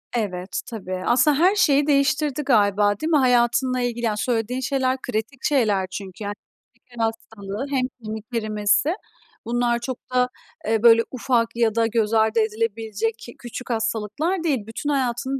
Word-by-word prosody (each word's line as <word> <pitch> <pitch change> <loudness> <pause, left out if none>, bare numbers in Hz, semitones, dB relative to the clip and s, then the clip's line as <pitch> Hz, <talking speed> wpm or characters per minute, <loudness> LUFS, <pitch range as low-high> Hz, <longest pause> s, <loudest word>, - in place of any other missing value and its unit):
Evet. 190 -4 -2
Tabii. 190 -5 -5
Aslında 275 +4 +4
her 370 +5 +4
şeyi 290 -7 +3
değiştirdi 280 0 +2
galiba, 205 -4 +3
değil 315 - -2
mi? 305 - +5
Hayatınla 250 0 +2
ilgili, 240 -1 -2
yani, 215 -2 0
söylediğin 240 +2 -1
şeyler 260 0 0
kritik 240 +3 -4
şeyler 210 -9 +2
çünkü. 195 +1 -7
Yani, 205 - -3 0.4
hem 240 - -35
şeker 240 -2 -4
hastalığı 225 0 -4
hem 265 -3 +1 0.2
kemik 215 0 -5
erimesi. 215 - +1 0.5
Bunlar 240 0 +1
çok 250 +1 -4 0.2
da, 250 0 +3 0.4
eee, 225 0 +1
böyle, 230 -1 +7
ufak 245 -2 +1
ya 230 -2 +1
da 230 -1 +3
göz 225 -1 0
ardı 220 0 +3
edilebilecek 225 0 -1
ki 235 - -11
küçük 245 +1 -8
hastalıklar 230 - -1
değil. 265 -10 -1
Bütün 225 +6 -4
hayatını 265 -1 -1
235 Hz, 160 wpm, -23 LUFS, 220-260 Hz, 0.5 s, böyle